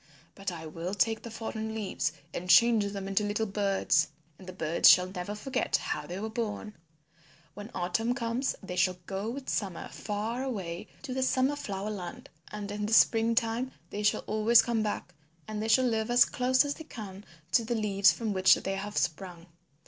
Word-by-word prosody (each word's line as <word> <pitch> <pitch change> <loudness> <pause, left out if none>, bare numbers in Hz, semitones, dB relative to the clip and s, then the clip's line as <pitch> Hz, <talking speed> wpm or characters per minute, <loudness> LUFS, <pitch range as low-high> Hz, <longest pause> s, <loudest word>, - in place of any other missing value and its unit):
But 195 -1 -4
I 165 -2 -7
will 170 +5 -5
take 220 +3 +1
the 235 - -8
fallen 220 -1 -5
leaves 200 -7 -2 0.2
and 180 +1 -5
change 220 +4 +6
them 200 -1 -4
into 195 +2 +1
little 210 +2 -1
birds. 195 -5 +1 0.3
And 185 - -13
the - - -5
birds 165 -2 +4
shall 180 - +7
never 185 +2 -5
forget 260 +5 -1
how - - -4
they 180 +2 -5
were 215 - -3
born. 220 -2 -4 0.8
When 205 +2 -9
autumn 185 +7 0
comes 235 +2 -1
they 180 -2 -5
shall 180 0 +2
go 195 +3 -3
with 265 +3 -6
summer 190 -5 -3
far 220 +4 -3
away 190 -10 -4 0.2
to 265 -4 -5
the 260 - -1
Summer 260 +2 +2
Flower 200 -5 -4
Land, 180 -4 -7 0.2
but 205 -1 -5
in 210 0 -3
the 220 - -2
spring 225 0 +5
time 230 +3 0 0.2
they 205 - -4
shall 210 0 +2
always 220 +2 +5
come 235 -2 0
back 205 -4 -3 0.3
and 215 -1 -4
they 220 - -2
shall 255 +3 +4
live 220 -2 0
as 245 +1 +6
close 255 +2 +2
as 285 - -1
they 320 - -11
can 200 -7 -9 0.3
to 235 - +4
the 235 +2 -2
leaves 200 -3 +4
from 220 -3 -3
which 185 -1 +6
they 195 0 -3
have 205 +1 -5
sprung. 175 0 -2
210 Hz, 195 wpm, -29 LUFS, 190-230 Hz, 0.8 s, shall